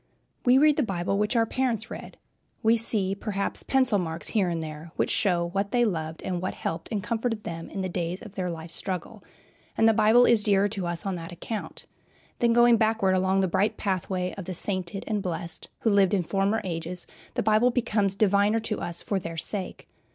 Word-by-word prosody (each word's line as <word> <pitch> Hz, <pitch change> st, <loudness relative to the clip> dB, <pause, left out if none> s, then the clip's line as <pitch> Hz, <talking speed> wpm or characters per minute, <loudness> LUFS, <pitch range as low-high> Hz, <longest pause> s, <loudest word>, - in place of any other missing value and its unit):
We 250 Hz, +1 st, +7 dB
read 300 Hz, +1 st, +5 dB
the -, -, +3 dB
Bible 195 Hz, -3 st, -1 dB
which 210 Hz, +4 st, 0 dB
our 230 Hz, -1 st, +4 dB
parents 230 Hz, -3 st, -1 dB
read. -, -, -8 dB, 0.5 s
We 225 Hz, +1 st, +5 dB
see, 215 Hz, -4 st, +1 dB
perhaps, 200 Hz, 0 st, -2 dB
pencil 255 Hz, -6 st, +2 dB
marks 165 Hz, -2 st, -2 dB
here 195 Hz, -5 st, +1 dB
and 165 Hz, -1 st, -2 dB
there, 155 Hz, +1 st, -8 dB
which -, -, 0 dB
show 175 Hz, -4 st, +2 dB
what 195 Hz, +3 st, -1 dB
they 240 Hz, +2 st, +2 dB
loved 160 Hz, -5 st, -3 dB
and 180 Hz, -2 st, -2 dB
what 185 Hz, -, -3 dB
helped 165 Hz, -, -4 dB
and 205 Hz, -3 st, -2 dB
comforted 225 Hz, 0 st, -2 dB
them 165 Hz, -1 st, -6 dB
in 195 Hz, -, -4 dB
the 185 Hz, -, -1 dB
days 175 Hz, 0 st, -3 dB
of 210 Hz, -4 st, -11 dB
their 185 Hz, -3 st, -3 dB
life 165 Hz, -1 st, -7 dB
struggle, 180 Hz, 0 st, -4 dB, 0.5 s
and 225 Hz, -, +5 dB
the 225 Hz, -, +5 dB
Bible 220 Hz, +3 st, +5 dB
is 235 Hz, -3 st, +5 dB
dearer 200 Hz, -1 st, +3 dB
to 195 Hz, -4 st, -3 dB
us 170 Hz, +1 st, -3 dB
on 195 Hz, -, -1 dB
that 165 Hz, 0 st, -8 dB
account. 205 Hz, +5 st, -6 dB, 0.5 s
Then, 235 Hz, -1 st, +3 dB
going 240 Hz, 0 st, +6 dB
backward 220 Hz, -3 st, +2 dB
along 190 Hz, +1 st, +2 dB
the 190 Hz, -, +2 dB
bright 195 Hz, +4 st, +1 dB
pathway 185 Hz, -2 st, -2 dB
of 190 Hz, -, -6 dB
the 185 Hz, -, -3 dB
sainted 185 Hz, 0 st, -1 dB
and 210 Hz, -2 st, -1 dB
blessed 170 Hz, -3 st, -2 dB
who 225 Hz, -, +2 dB
lived 200 Hz, -1 st, +4 dB
in 185 Hz, -, +1 dB
former 195 Hz, +5 st, 0 dB
ages, 175 Hz, 0 st, -4 dB, 0.3 s
the -, -, 0 dB
Bible 220 Hz, +3 st, +4 dB
becomes 210 Hz, -5 st, +1 dB
diviner 205 Hz, +2 st, +3 dB
to 215 Hz, -1 st, -2 dB
us 170 Hz, 0 st, -4 dB
for 200 Hz, -, -1 dB
their 165 Hz, -2 st, -7 dB
sake. 185 Hz, +3 st, -4 dB
195 Hz, 210 wpm, -26 LUFS, 175-220 Hz, 0.5 s, We